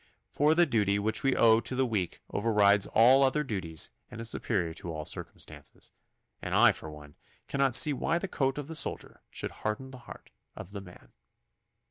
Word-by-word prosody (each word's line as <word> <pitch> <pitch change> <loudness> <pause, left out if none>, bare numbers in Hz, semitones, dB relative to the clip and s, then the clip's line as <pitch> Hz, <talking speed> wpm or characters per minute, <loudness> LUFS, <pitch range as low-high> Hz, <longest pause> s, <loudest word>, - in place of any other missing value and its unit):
For 150 +2 +2
the 175 +1 +5
duty 105 -7 +1
which 110 +2 -1
we 135 -1 +1
owe 115 -1 +5
to 130 - -6
the 130 0 +1
weak 105 -8 -3
overrides 100 -2 +3
all 125 +5 +5
other 140 +3 +2
duties 95 - -3 0.2
and - - -10
is 115 0 0
superior 85 -8 -1
to 85 +1 -7
all 75 -1 -6
circumstances, - - -7 0.5
and - - -3
I - - +6
for 80 - -9
one 75 -1 -13 0.3
cannot 135 -3 +1
see 150 0 +6
why 160 +5 -1
the 195 - -4
coat 135 -6 -1
of 145 - -4
the 160 - -7
soldier 165 - -2
should - - -6
harden 120 +5 -4
the 130 - -11
heart - - -12 0.2
of 95 - -10
the 100 -1 -7
man. 90 -10 -16
115 Hz, 190 wpm, -29 LUFS, 100-135 Hz, 0.5 s, I